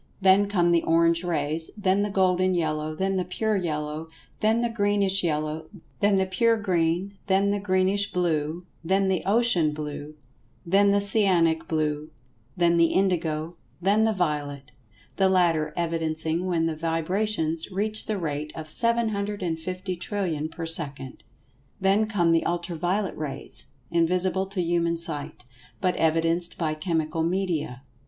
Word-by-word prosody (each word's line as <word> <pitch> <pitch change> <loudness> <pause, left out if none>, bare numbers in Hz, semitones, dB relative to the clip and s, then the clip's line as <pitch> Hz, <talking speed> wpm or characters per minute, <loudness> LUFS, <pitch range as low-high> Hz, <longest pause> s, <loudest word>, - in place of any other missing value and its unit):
Then 195 +1 +5
come 175 -4 +2
the 170 -1 +4
orange 165 +1 +2
rays, 160 -1 0
then 195 -1 +2
the 205 - 0
golden 185 -1 +2
yellow, 155 -2 -1
then 190 +3 0
the 185 - 0
pure 215 +5 -1
yellow, 155 -3 -3 0.3
then 220 +2 +2
the - - +2
greenish 205 -3 +2
yellow, 155 -1 -2 0.3
then 205 0 +3
the 190 0 +2
pure 230 +5 +2
green, 185 0 -1
then 200 +1 +3
the 205 - 0
greenish 195 +1 +1
blue, 165 -1 -1 0.2
then 190 +3 +2
the 185 -2 +1
ocean 200 -8 +3
blue, 150 0 -6 0.5
then 200 +4 +4
the 200 0 +3
cyanic 185 -6 +2
blue, 155 -1 -1 0.5
then 170 -1 +3
the 170 0 +5
indigo, 170 -4 0 0.2
then 200 +5 +3
the 220 - +3
violet—the 145 - -3
latter 165 -5 +2
evidencing 165 0 -1
when 170 -3 +1
the 165 -1 -1
vibrations 165 +1 -1
reach 215 +3 -2
the 215 -2 -1
rate 150 -3 -3
of 160 - -6
750,000,000,000,000 185 -5 -2
per 165 0 -6
second. 140 -5 -3 0.6
Then 195 +3 +2
come 175 -6 +2
the 165 0 +3
Ultra 175 0 -3
violet 180 +4 -1
rays—invisible 165 +6 -2
to 195 -1 -3
human 170 0 0
sight—but 145 0 -4
evidenced 165 +2 0
by 160 -3 -1
chemical 160 -1 -1
media. 165 -7 -2
175 Hz, 135 wpm, -25 LUFS, 160-195 Hz, 0.6 s, Then